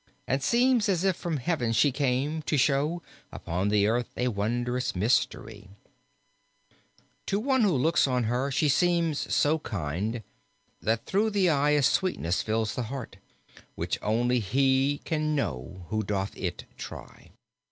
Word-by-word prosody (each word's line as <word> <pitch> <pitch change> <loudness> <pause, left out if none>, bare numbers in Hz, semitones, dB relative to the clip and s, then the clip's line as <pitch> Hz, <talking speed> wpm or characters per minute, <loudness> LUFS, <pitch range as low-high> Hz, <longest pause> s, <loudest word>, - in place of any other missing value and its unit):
And 135 +2 0
seems 240 - +3
as 180 -2 +1
if 190 -2 +2
from 170 -3 -3
heaven 125 -4 -1
she 140 +5 +4
came, 140 +3 0
to 150 - +1
show 150 +5 +1 0.3
Upon 90 +4 -3
the 105 -1 +3
earth 120 +3 0
a 125 0 +1
wondrous 120 +4 -1
mystery: 105 0 -1 1.6
To 200 - 0
one 260 +2 +2
who 205 -5 +3
looks 155 +4 +3
on 125 -2 +1
her 125 +5 0
she 145 +3 +1
seems 165 +1 +1
so 155 +2 +2
kind, 105 - -3 0.6
That 110 +1 0
through 210 +3 +1
the 195 -4 +2
eye 150 0 +3
a 145 - +2
sweetness 140 - +1
fills 110 0 -1
the 125 - -3
heart, 130 -7 -6 0.6
Which - - -2
only 120 +3 +1
he 135 +6 +1
can 155 -1 0
know 90 - -4
who 110 0 0
doth 95 -1 -3
it - - -4
try. - - -10
130 Hz, 150 wpm, -27 LUFS, 110-155 Hz, 1.6 s, she